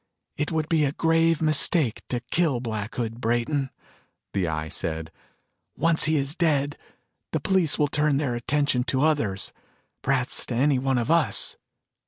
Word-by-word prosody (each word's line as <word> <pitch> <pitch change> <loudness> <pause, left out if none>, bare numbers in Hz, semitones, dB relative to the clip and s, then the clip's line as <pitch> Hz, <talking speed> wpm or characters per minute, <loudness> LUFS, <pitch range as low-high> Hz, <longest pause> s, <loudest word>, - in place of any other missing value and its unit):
"It 150 - -2
would 160 -1 -1
be 160 -2 +2
a 140 -1 0
grave 165 0 +2
mistake 155 -4 +3
to 120 -1 -2
kill 160 -8 +2
Black 110 -3 -4
Hood, 115 0 -3
Brayton," 120 +4 0 0.6
the 95 -3 0
Eye 80 -1 -2
said. 80 0 -4 0.7
"Once 165 0 +3
he 155 +1 +2
is 140 0 0
dead, 145 -4 +1 0.6
the - - +1
police 185 -6 +1
will 150 - +2
turn 150 -1 +1
their 140 -4 -1
attention 135 +1 0
to 130 +2 0
others 145 -12 +1 0.5
perhaps 130 -2 0
to 120 - -3
any 135 +2 +3
one 135 0 0
of 120 +5 0
us. 170 -2 +2
140 Hz, 160 wpm, -25 LUFS, 120-155 Hz, 0.7 s, mistake